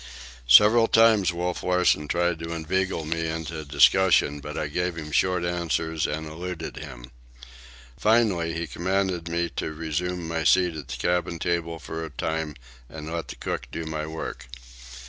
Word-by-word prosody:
Several 105 - +7
times 110 -5 +5
Wolf 90 +1 -3
Larsen 90 -4 +2
tried 85 +1 0
to 85 0 -5
inveigle 85 +1 -1
me 85 +1 -2
into 80 0 -4
discussion, 75 0 +4
but 75 +1 -7
I - - -1
gave 90 +4 -2
him 75 -2 -7
short 90 +2 +1
answers 85 -2 -1
and 80 +1 -3
eluded 80 +1 -6
him. - - -9 0.9
Finally, 105 -7 +2
he 85 0 -3
commanded 90 +3 -1
me 85 +1 0
to - - -2
resume 85 +3 -3
my 80 0 -2
seat 90 +2 +3
at 75 -4 -7
the 60 - -5
cabin 90 -1 0
table 85 0 -2
for 80 +2 -6
a 80 - -5
time 80 +1 -3 0.3
and 80 +1 -7
let 85 -1 -3
the - - -7
cook 60 - -4
do 80 - -5
my 80 -1 -4
work. 80 -5 -6
85 Hz, 165 wpm, -25 LUFS, 80-90 Hz, 0.9 s, Several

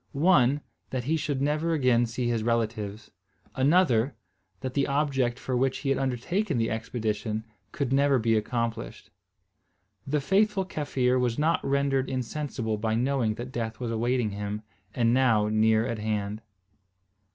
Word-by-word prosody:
One, 145 -3 +4 0.3
that 130 -2 -3
he 150 +6 +1
should 145 -4 -1
never 155 +3 +1
again 125 -5 +3
see 120 +1 -2
his 115 -2 0
relatives; 110 -2 -2 0.4
another, 135 -3 +3 0.5
that 130 -1 -4
the 140 0 +1
object 135 -4 +1
for 130 - -3
which 130 +1 +1
he - - +1
had 135 - +2
undertaken 135 - -1
the 115 -1 0
expedition 110 -1 -2 0.3
could 135 -3 -2
never 140 0 +4
be 115 -1 +2
accomplished. 115 +1 -3 1.0
The 150 +2 +1
faithful 195 +5 +2
Kaffir 130 -7 0
was 120 -2 0
not 160 +3 +1
rendered 135 -1 +1
insensible 130 -4 -3
by 110 0 0
knowing 125 -2 +1
that 120 +3 -7
death 115 -3 -4
was 120 -2 -3
awaiting 120 0 0
him, 105 +1 -4 0.3
and 115 -1 +3
now 115 -5 +3
near 110 +1 +3
at 115 -3 -3
hand. 105 0 -2
125 Hz, 150 wpm, -27 LUFS, 115-140 Hz, 1.0 s, One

